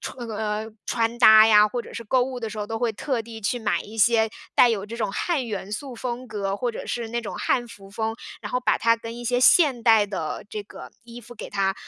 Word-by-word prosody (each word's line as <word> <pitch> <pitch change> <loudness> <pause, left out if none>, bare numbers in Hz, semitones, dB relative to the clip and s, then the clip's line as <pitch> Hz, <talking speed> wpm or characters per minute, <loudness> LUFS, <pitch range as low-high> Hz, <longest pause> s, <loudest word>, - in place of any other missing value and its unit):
穿 240 -3 -7
那 220 - -5
呃， 215 +1 -3 0.2
穿 230 0 -1
搭 220 -2 +8
呀， 210 -1 +7
或 235 +3 -4
者 - - -13
是 230 - -7
购 255 +4 +2
物 255 0 -4
的 225 -2 -4
时 215 - -9
候， 210 - -3
都 225 0 -3
会 235 -2 0
特 250 +2 -2
地 225 0 -9
去 230 +4 -1
买 220 -3 0
一 220 +2 -10
些 220 0 +4 0.2
带 245 - +6
有 205 -3 -2
这 230 +2 -7
种 220 -4 -2
汉 300 - -1
元 205 -3 -5
素 260 +5 -5
风 245 +1 -5
格， 200 -2 -3
或 245 +2 -1
者 - - -8
是 235 -2 -3
那 235 +1 -2
种 220 - -7
汉 240 -1 0
服 195 -4 -14
风， 220 +2 -3 0.3
然 - - -7
后 250 - 0
把 - - +1
它 230 0 +4
跟 230 0 -8
一 240 - -8
些 245 +1 +1
现 265 -5 +5
代 220 -3 +5
的 190 -6 -5
这 210 -1 -5
个 - - -12
衣 235 +1 -11
服 240 +1 -13
给 - - -9
它， 195 -1 0
225 Hz, 280 characters per minute, -24 LUFS, 210-240 Hz, 0.3 s, 搭